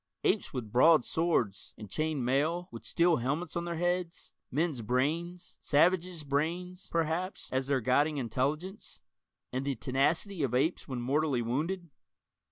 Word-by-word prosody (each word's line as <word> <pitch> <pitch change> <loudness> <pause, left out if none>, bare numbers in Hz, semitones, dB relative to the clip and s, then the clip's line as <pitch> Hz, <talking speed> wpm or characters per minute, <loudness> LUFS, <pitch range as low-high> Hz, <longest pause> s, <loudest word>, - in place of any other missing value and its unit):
Apes - - +1
with 115 -5 -5
broadswords 155 - +3
and 105 - -8
chained 150 +5 -1
mail, 160 +8 +1
with - - -9
steel 170 -1 +3
helmets 145 +7 -2
on 170 0 -1
their 170 -1 -3
heads 175 0 -2 0.2
men's 150 -2 0
brains, 155 +10 -1
savages' 175 +2 +2
brains, 170 +6 -2
perhaps, 170 +3 -1
as 130 0 0
their 135 -2 +1
guiding 145 +5 +2
intelligence 145 - -3 0.5
and 130 +1 -1
the 140 -1 -1
tenacity 155 +9 0
of 125 -3 0
apes 150 +7 +1
when 130 -3 -4
mortally 140 -1 +1
wounded? 160 +8 -2
155 Hz, 140 wpm, -31 LUFS, 130-170 Hz, 0.5 s, broadswords